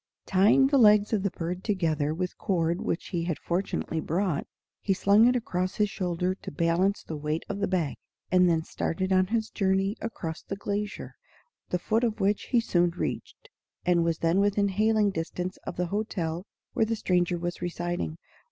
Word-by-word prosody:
Tying 200 +8 +5
the 275 0 +3
legs 210 -1 +5
of 210 - +2
the 200 - 0
bird 175 +1 -5
together 160 -8 0
with 180 +3 -3
cord 170 -4 0
which 165 - -3
he 170 -3 -2
had 170 -3 -1
fortunately 175 -2 -2
brought, 170 0 -1 0.3
he 195 - 0
slung 205 +5 +5
it 250 - +3
across 185 -6 -1
his 210 -1 +1
shoulder 180 -1 -1
to 190 - -9
balance 170 +6 +1
the 160 - -6
weight 150 +2 -3
of 200 - -4
the 200 - +1
bag, 175 -6 -1 0.3
and 180 -1 +5
then 165 -1 +2
started 190 +4 -2
on 185 0 +4
his 220 +1 -1
journey 195 0 +1
across 165 -8 -5
the 195 - -5
glacier, 205 +1 -4 0.6
the 180 - +1
foot 220 +6 0
of 225 -2 0
which 200 +1 +1
he 245 - +2
soon 175 -6 +2
reached, 175 - -5 0.4
and 175 -1 +3
was 165 -1 0
then 165 +3 +2
within 200 0 +2
hailing 215 +1 +2
distance 180 +1 -4
of - - -4
the 180 - -1
hotel 185 -4 -2 0.3
where 225 - +2
the 225 - 0
stranger 180 -3 +1
was 175 +1 -4
residing. 175 -2 -3
185 Hz, 185 wpm, -27 LUFS, 170-205 Hz, 0.6 s, Tying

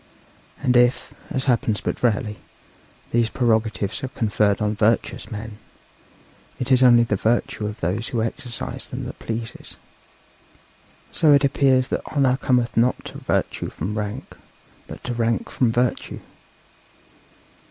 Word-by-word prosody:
And 125 - +2
if, 120 +1 +3 0.2
as 130 - -1
happens 115 -5 +1
but - - -4
rarely, 105 -3 0 0.7
these 115 -1 +2
prerogatives 110 -1 0
are - - -1
conferred 105 -4 +1
on 105 0 0
virtuous 110 +2 0
men, 110 -1 -7 1.0
it 125 +1 -2
is 130 0 +5
only 120 -2 +7
the 110 -3 0
virtue 110 0 0
of 105 +1 -6
those 95 +7 -1
who 115 -3 -1
exercise 115 +1 -5
them - - -6
that - - -7
pleases. 115 0 -6 1.4
So 155 -2 +4
it 140 0 +5
appears 135 -2 +3
that - - -1
honour 135 -3 +2
cometh 125 -3 +1
not 120 +2 +2
to - - -8
virtue - - -1
from 105 +2 -4
rank, 105 -1 -5 0.5
but - - -10
to 125 - -3
rank 115 -1 -1
from 125 -3 +2
virtue. 120 +1 -1
115 Hz, 140 wpm, -23 LUFS, 110-125 Hz, 1.4 s, only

